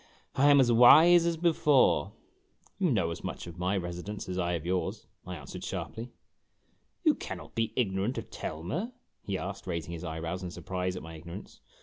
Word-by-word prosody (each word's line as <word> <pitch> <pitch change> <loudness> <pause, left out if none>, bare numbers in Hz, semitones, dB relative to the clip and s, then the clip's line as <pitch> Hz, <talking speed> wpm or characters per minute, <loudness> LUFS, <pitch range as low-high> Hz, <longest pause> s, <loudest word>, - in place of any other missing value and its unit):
" - - -37
I 145 +2 +5
am 145 -1 +7
as 125 -3 +4
wise 165 +9 +8
as 170 -1 0
before! 150 - +3 0.2
" - - -41
" - - -33
You 185 -3 +2
know 95 - +1
as 85 - -7
much - - -5
of 85 0 -10
my 95 +3 0
residence 90 +3 -5
as 90 0 -3
I 90 0 0
of 85 -2 -3
yours! 90 +1 -2
' - - -26
I 90 - -5
answered 75 - -9
sharply. 115 +2 -5 0.5
" - - -43
You - - +6
cannot - - -8
be 115 -1 -1
ignorant 100 0 0
of - - -6
Telmer? 145 - -4
' - - -50
he 100 -2 -1
asked, 95 +2 -6
raising 85 -1 -3
his 85 0 -7
eyebrows 80 +2 -4
in 90 - -5
surprise 90 +1 -3
at 90 - -7
my 80 0 -9
ignorance. 85 +4 -10
95 Hz, 215 wpm, -29 LUFS, 85-125 Hz, 0.5 s, wise